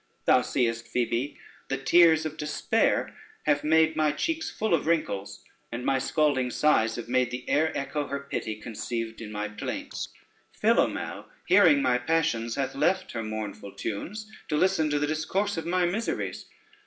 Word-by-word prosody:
Thou 125 - +5
seest, 115 -2 -1
Phoebe, 125 +3 -1 0.3
the 135 - -1
tears 160 +3 +5
of 155 -1 -4
despair 155 +9 0 0.3
have 295 - +2
made 160 +1 +4
my 155 -1 +2
cheeks 320 - -2
full 220 -3 -1
of 160 -2 +1
wrinkles, 100 -12 -1 0.3
and 120 +1 -5
my 135 -1 +2
scalding 135 -2 +1
sighs 115 -5 +2
have 120 -1 -6
made 125 0 +2
the 125 +1 -6
air 155 +3 +2
echo 145 +1 -2
her 140 - -3
pity 115 -5 -4
conceived 115 +1 -5
in 105 -2 -7
my 105 0 -3
plaints: 105 0 -5 0.5
Philomele - - +1 0.2
hearing 175 -7 +6
my 125 -1 +3
passions, 125 -5 0
hath 135 -2 -2
left 185 +6 +1
her 115 - -3
mournful 110 -2 -5
tunes 205 - -5 0.2
to 150 - 0
listen 185 -2 +2
to 145 - +1
the 145 - +1
discourse 160 +7 -1
of 165 -1 -4
my 180 +1 +2
miseries. 205 +7 -2
145 Hz, 165 wpm, -27 LUFS, 120-160 Hz, 0.5 s, hearing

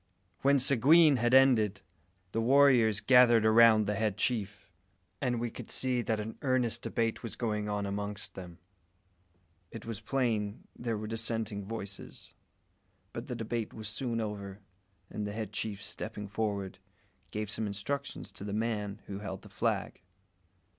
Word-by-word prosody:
When 140 0 +4
Seguin 140 +4 +5
had 120 0 +1
ended, 115 -7 +4 0.5
the 115 - -1
warriors 120 -4 +5
gathered 120 -1 +6
around 110 -1 +6
the 105 - 0
head 105 -1 -1
chief, 105 -5 -2 0.5
and 125 -3 0
we 120 0 -2
could 120 - -9
see 125 -2 +1
that 110 -2 -1
an 110 +1 -6
earnest 125 -3 +1
debate 115 -1 -1
was 115 - -6
going 105 -3 -2
on 105 -1 -1
amongst 100 +1 -4
them. 90 -3 -9 1.1
It 115 - -9
was 115 -2 -6
plain 110 -4 -1
there 115 -2 -3
were 105 - -5
dissenting 110 -2 -2
voices; 100 -2 -8 0.8
but - - -6
the - - -4
debate 115 0 -4
was 110 -2 -6
soon 115 +1 -2
over, 100 -3 -5 0.5
and 105 -1 -3
the 100 - -5
head 110 -1 -5
chief, 105 -1 -3
stepping 105 -2 -6
forward, 100 -2 -3 0.5
gave 105 -1 -4
some 110 0 -2
instructions 135 +8 -4
to - - -9
the 100 0 -4
man 105 -2 -2
who 100 0 -6
held 95 -2 -6
the - - -12
flag. - - -2
110 Hz, 155 wpm, -31 LUFS, 105-120 Hz, 1.1 s, gathered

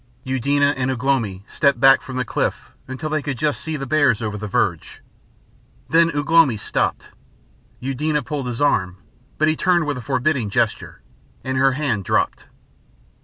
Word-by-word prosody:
Eudena 140 +2 +1
and 130 0 -1
Ugh 130 -2 -3
lomi 110 -9 0
stepped 140 -4 +1
back 135 +1 +6
from 130 - -8
the 130 - -1
cliff - - -3 0.2
until 130 +4 -5
they 155 -1 0
could 140 -3 -4
just 150 +3 -1
see 160 -1 -4
the 135 - -5
bears 140 -4 +2
over 110 -2 -3
the 105 +1 -5
verge. 95 - -1 0.9
Then 165 +1 +4
Ugh 145 - -2
lomi 165 -9 +5
stopped. - - -2 0.7
Eudena 145 +3 -1
pulled 135 +1 -4
his 120 +3 -2
arm, 95 -10 +1 0.4
but 155 - +2
he 155 - +2
turned 175 -1 +2
with 145 -3 -2
a - - -7
forbidding 130 -2 0
gesture, - - -2 0.4
and 130 0 -3
her 135 0 +3
hand 130 -8 -1
dropped. - - -1
135 Hz, 170 wpm, -21 LUFS, 125-150 Hz, 0.9 s, back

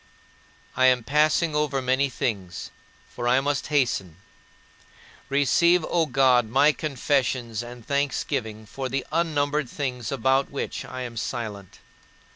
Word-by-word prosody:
I 130 - +5
am 125 -2 +3
passing 155 +5 +2
over 150 -2 0
many 130 +2 +1
things, 95 -8 -4 0.4
for 120 0 -5
I 125 +2 +4
must 140 0 -1
hasten. 120 - 0 1.1
Receive, 155 +5 +3
O 165 -2 +1
my - - -15
God, 125 -3 +4
my 140 +5 +5
confessions 130 -6 -1
and 120 -1 -10
thanksgiving 125 -6 -2
for 130 +5 -5
the 135 +1 -2
unnumbered 150 -4 0
things 125 -5 -4
about 135 +1 +1
which 140 - -4
I 130 0 -7
am 120 -2 -7
silent. 110 -5 -5
130 Hz, 130 wpm, -25 LUFS, 120-145 Hz, 1.1 s, I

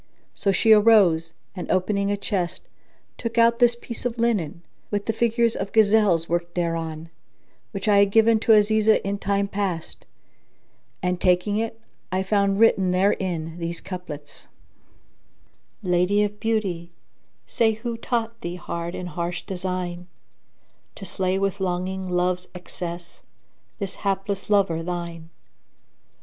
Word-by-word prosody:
So 200 - 0
she 220 +4 +3
arose, 200 -7 +5 0.2
and 180 - -6
opening 200 +2 +1
a 205 - 0
chest, 185 -4 -2 0.6
took 230 -1 -4
out 235 0 +5
this 240 -1 +5
piece 235 - -7
of 245 -1 -2
linen, 205 -9 0 0.3
with 205 -1 -2
the 225 - 0
figures 235 0 +1
of 195 +1 -4
gazelles 210 -6 +4
worked 175 0 -2
thereon, 165 -2 -3 0.6
which 195 0 -5
I 205 -1 +5
had 200 0 +5
given 225 +1 +4
to 225 - +4
Azizah 215 +1 +4
in 200 0 -2
time 200 0 0
past; 195 -5 -4 1.0
and 180 0 -1
taking 180 +3 +2
it 225 0 -3 0.3
I 185 +1 0
found 200 0 +1
written 195 -4 +4
therein 180 -3 0
these 170 0 -4
couplets, 150 -6 -8 1.4
"Lady 180 +3 +2
of 210 0 -3
beauty, 195 -7 -1 0.6
say, 225 -1 +2
who 230 +2 -4
taught 230 -1 -3
thee 175 +1 -4
hard 170 -1 -5
and 180 -1 -5
harsh 175 0 -4
design, 180 -1 -4 0.4
* - - -42
To 195 - -9
slay 185 +1 0
with 195 0 -1
longing 185 0 -2
Love's 180 0 0
excess 175 -1 -6 0.6
this 195 -2 -3
hapless 195 0 -2
lover 195 -6 +2
thine? 170 -1 -5
195 Hz, 135 wpm, -24 LUFS, 175-215 Hz, 1.4 s, arose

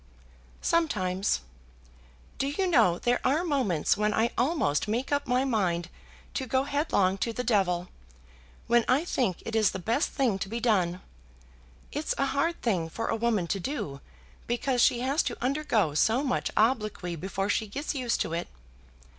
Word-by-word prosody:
"Sometimes. 195 - +1 1.0
Do 275 - +1
you 335 +7 -1
know, 185 - +4
there 245 +4 +1
are 290 +6 +2
moments 260 - +1
when 210 0 0
I 230 +2 +2
almost 245 - +1
make 235 +7 -2
up 285 -1 0
my 250 +1 +2
mind 180 -8 0 0.4
to 265 - -3
go 260 +2 +2
headlong 275 - +1
to 230 - 0
the 250 +2 -3
devil, 185 -6 +1 0.8
when 235 0 +4
I 275 +6 +3
think 235 - -1
it 225 - -4
is 215 -2 +4
the - - -4
best 230 - 0
thing 245 -9 0
to 195 - -4
be 230 +2 -3
done. 185 -7 +1 0.9
It's 295 +2 -2
a 275 - +2
hard 335 +4 0
thing 180 -8 0
for 225 +7 -4
a - - +1
woman 225 -5 +1
to 195 - 0
do, 170 - -4 0.5
because 245 +1 0
she 240 0 +4
has 275 +5 +2
to - - -3
undergo 245 - +1
so 225 - +2
much 260 -3 0
obloquy 215 -6 +1
before 195 +3 -3
she 220 +1 0
gets 285 +11 -4
used 255 -4 -1
to 165 - -2
it. 170 +1 -2
230 Hz, 170 wpm, -28 LUFS, 190-270 Hz, 1.0 s, know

